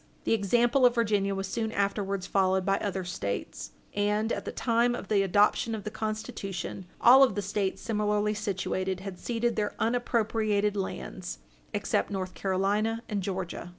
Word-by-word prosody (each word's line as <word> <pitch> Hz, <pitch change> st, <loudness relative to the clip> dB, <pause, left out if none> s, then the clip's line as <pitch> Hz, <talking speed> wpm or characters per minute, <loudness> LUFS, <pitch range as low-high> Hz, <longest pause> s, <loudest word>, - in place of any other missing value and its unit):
The -, -, +2 dB
example 240 Hz, +5 st, +3 dB
of 245 Hz, -1 st, +6 dB
Virginia 205 Hz, -4 st, +1 dB
was 195 Hz, 0 st, -2 dB
soon 220 Hz, +2 st, -2 dB
afterwards 200 Hz, -2 st, -1 dB
followed 190 Hz, -1 st, +2 dB
by 195 Hz, 0 st, +2 dB
other 195 Hz, -2 st, -2 dB
States, 100 Hz, -, -4 dB, 0.2 s
and, 210 Hz, +2 st, +1 dB
at -, -, -4 dB
the -, -, -3 dB
time 240 Hz, 0 st, +2 dB
of 195 Hz, -, -7 dB
the 205 Hz, -2 st, +3 dB
adoption 205 Hz, +4 st, +3 dB
of 210 Hz, -, -6 dB
the 215 Hz, -, -5 dB
Constitution, 195 Hz, -4 st, -4 dB
all 255 Hz, +3 st, +8 dB
of 255 Hz, -6 st, +5 dB
the 205 Hz, -, 0 dB
States, 200 Hz, 0 st, -2 dB
similarly 210 Hz, -1 st, +1 dB
situated 190 Hz, -2 st, -2 dB
had 190 Hz, -2 st, -7 dB
ceded 235 Hz, 0 st, -1 dB
their 210 Hz, -1 st, -1 dB
unappropriated 220 Hz, -3 st, +1 dB
lands, 190 Hz, -, -4 dB, 0.3 s
except 100 Hz, -, 0 dB
North 185 Hz, -2 st, -3 dB
Carolina 205 Hz, +4 st, 0 dB
and 205 Hz, -3 st, -2 dB
Georgia. 185 Hz, -2 st, -4 dB
205 Hz, 160 wpm, -28 LUFS, 195-225 Hz, 0.3 s, all